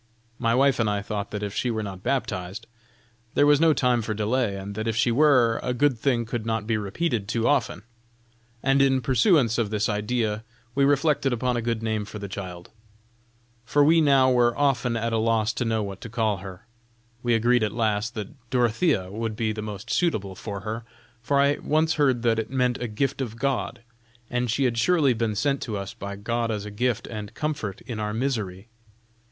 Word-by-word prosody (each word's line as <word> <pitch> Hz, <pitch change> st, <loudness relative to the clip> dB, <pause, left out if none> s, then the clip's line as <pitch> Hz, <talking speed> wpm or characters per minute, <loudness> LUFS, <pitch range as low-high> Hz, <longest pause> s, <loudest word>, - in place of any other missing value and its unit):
"My 115 Hz, -1 st, +2 dB
wife 135 Hz, 0 st, +3 dB
and 110 Hz, -2 st, +2 dB
I 100 Hz, -1 st, -1 dB
thought 100 Hz, -1 st, -4 dB
that 105 Hz, 0 st, -4 dB
if 100 Hz, -1 st, -3 dB
she 125 Hz, -, -1 dB
were 110 Hz, -2 st, -2 dB
not 95 Hz, -2 st, -7 dB
baptized, 100 Hz, -7 st, -2 dB, 0.7 s
there 145 Hz, -, +5 dB
was 145 Hz, -1 st, +5 dB
no 165 Hz, -1 st, +6 dB
time 125 Hz, -5 st, +2 dB
for 110 Hz, -1 st, -3 dB
delay, 110 Hz, 0 st, 0 dB
and 100 Hz, +1 st, -6 dB
that 110 Hz, +2 st, -4 dB
if 115 Hz, -, 0 dB
she 115 Hz, +1 st, +2 dB
were, 125 Hz, -4 st, +4 dB
a 125 Hz, -, -2 dB
good 145 Hz, +1 st, +3 dB
thing 120 Hz, -2 st, +1 dB
could 115 Hz, 0 st, -3 dB
not 110 Hz, -2 st, -2 dB
be 115 Hz, 0 st, 0 dB
repeated 110 Hz, -, -2 dB
too 115 Hz, +1 st, 0 dB
often. 130 Hz, -7 st, +1 dB, 0.8 s
And 135 Hz, +1 st, +3 dB
in 135 Hz, -1 st, +3 dB
pursuance 125 Hz, -, +3 dB
of 110 Hz, -3 st, 0 dB
this 105 Hz, 0 st, 0 dB
idea, 105 Hz, 0 st, -1 dB, 0.3 s
we 140 Hz, +2 st, +3 dB
reflected 145 Hz, -1 st, +2 dB
upon 125 Hz, +1 st, 0 dB
a 120 Hz, -, -1 dB
good 115 Hz, -1 st, -2 dB
name 110 Hz, -2 st, -1 dB
for 105 Hz, -, -8 dB
the 100 Hz, -1 st, -6 dB
child, 90 Hz, -3 st, -7 dB, 0.9 s
for 145 Hz, +5 st, +3 dB
we 160 Hz, +3 st, +5 dB
now 135 Hz, -3 st, +5 dB
were 120 Hz, -1 st, +3 dB
often 130 Hz, -4 st, +1 dB
at 115 Hz, 0 st, -1 dB
a 115 Hz, -, +2 dB
loss 110 Hz, 0 st, +1 dB
to 125 Hz, -, -2 dB
know 110 Hz, -1 st, 0 dB
what 100 Hz, -1 st, -7 dB
to 115 Hz, -, -7 dB
call 110 Hz, -3 st, 0 dB
her. 95 Hz, +2 st, -10 dB, 0.6 s
We 120 Hz, -1 st, +2 dB
agreed 120 Hz, +2 st, +3 dB
at 105 Hz, -1 st, 0 dB
last 110 Hz, +1 st, -1 dB
that 110 Hz, +2 st, -8 dB
Dorothea 120 Hz, -, +1 dB
would 110 Hz, +1 st, -3 dB
be 110 Hz, 0 st, -1 dB
the 110 Hz, -, -5 dB
most 105 Hz, -2 st, -6 dB
suitable 105 Hz, -, 0 dB
for 100 Hz, +1 st, -6 dB
her, 110 Hz, +3 st, -4 dB, 0.4 s
for 140 Hz, +4 st, +1 dB
I 140 Hz, +1 st, +3 dB
once 160 Hz, +1 st, +1 dB
heard 130 Hz, -6 st, +2 dB
that 115 Hz, -1 st, +2 dB
it 110 Hz, -, -3 dB
meant 125 Hz, -2 st, 0 dB
a 125 Hz, -, -1 dB
gift 135 Hz, +6 st, -1 dB
of 115 Hz, -3 st, -4 dB
God, 130 Hz, -2 st, -2 dB, 0.5 s
and 125 Hz, 0 st, 0 dB
she 130 Hz, +5 st, +1 dB
had 120 Hz, -3 st, +1 dB
surely 155 Hz, -4 st, +3 dB
been 110 Hz, -2 st, -1 dB
sent 140 Hz, +5 st, 0 dB
to 110 Hz, -4 st, -3 dB
us 100 Hz, -1 st, -6 dB
by 100 Hz, 0 st, -6 dB
God 115 Hz, +3 st, -2 dB
as 105 Hz, -2 st, -3 dB
a 105 Hz, -, -7 dB
gift 120 Hz, +2 st, -1 dB
and 105 Hz, -1 st, -7 dB
comfort 145 Hz, -11 st, -3 dB
in 115 Hz, -4 st, -6 dB
our 105 Hz, 0 st, -2 dB
misery. 110 Hz, -6 st, -2 dB
115 Hz, 210 wpm, -25 LUFS, 105-130 Hz, 0.9 s, no